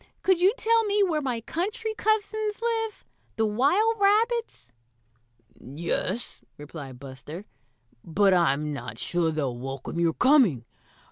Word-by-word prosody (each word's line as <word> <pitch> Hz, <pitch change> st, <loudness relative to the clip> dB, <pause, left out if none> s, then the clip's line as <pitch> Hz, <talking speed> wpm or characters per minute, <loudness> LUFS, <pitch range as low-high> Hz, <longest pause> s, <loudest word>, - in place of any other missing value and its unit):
Could 375 Hz, -2 st, +3 dB
you 375 Hz, +2 st, +6 dB
tell 455 Hz, 0 st, +3 dB
me 410 Hz, 0 st, +2 dB
where 325 Hz, -5 st, 0 dB
my 250 Hz, -5 st, -2 dB
country 410 Hz, -, -3 dB
cousins 435 Hz, -1 st, -1 dB
live 450 Hz, -2 st, -2 dB, 0.3 s
the 225 Hz, -, +1 dB
wild 325 Hz, -, +2 dB
rabbits?" 440 Hz, -, +1 dB, 0.9 s
"Yes," 170 Hz, -, -3 dB, 0.2 s
replied 145 Hz, -4 st, -9 dB
Buster, 140 Hz, +7 st, -9 dB, 0.6 s
"but 195 Hz, +4 st, +3 dB
I'm 150 Hz, -4 st, +1 dB
not 115 Hz, -6 st, -7 dB
sure 170 Hz, +5 st, 0 dB
they'll 145 Hz, -6 st, -2 dB
welcome 135 Hz, +5 st, -6 dB
your 170 Hz, -1 st, +2 dB
coming. 240 Hz, -, +3 dB
225 Hz, 125 wpm, -26 LUFS, -, 0.9 s, you